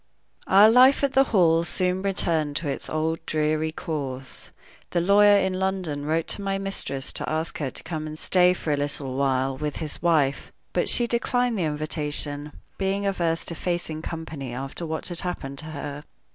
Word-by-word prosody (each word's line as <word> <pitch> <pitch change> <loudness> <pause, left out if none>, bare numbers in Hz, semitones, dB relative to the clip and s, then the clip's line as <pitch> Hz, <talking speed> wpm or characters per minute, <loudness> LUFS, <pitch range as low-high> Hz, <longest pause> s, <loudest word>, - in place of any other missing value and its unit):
OUR 205 +3 +7
life 260 +4 +6
at 275 -1 +2
the 270 +1 +5
Hall 170 -8 +3
soon 185 +1 0
returned 165 -6 0
to 155 0 -2
its 140 - -3
old, 160 +1 -1
dreary 155 0 0
course. 135 -5 -5 0.4
The 175 - 0
lawyer 205 +3 +6
in 190 -1 0
London 180 -7 -2
wrote 160 +1 +1
to - - -2
my 195 0 -1
mistress 195 -9 -3
to - - -2
ask 160 +1 -3
her 140 -4 -1
to - - -6
come 155 -2 -4
and 155 0 -7
stay 180 +2 +4
for 155 -4 -2
a - - 0
little 145 -2 -3
while 135 -1 +1
with 150 +2 -3
his 155 -2 -4
wife; 155 -5 +1 0.2
but - - +1
she 240 - +3
declined 240 +1 0
the 185 -5 0
invitation, 150 -1 -2 0.3
being 195 +1 0
averse 170 -4 0
to - - +1
facing 170 -2 -2
company 160 -7 -6
after 135 +6 -5
what 160 +3 -3
had 175 -2 0
happened 140 -7 -4
to 155 - -7
her. 145 -1 -6
160 Hz, 185 wpm, -25 LUFS, 145-190 Hz, 0.4 s, OUR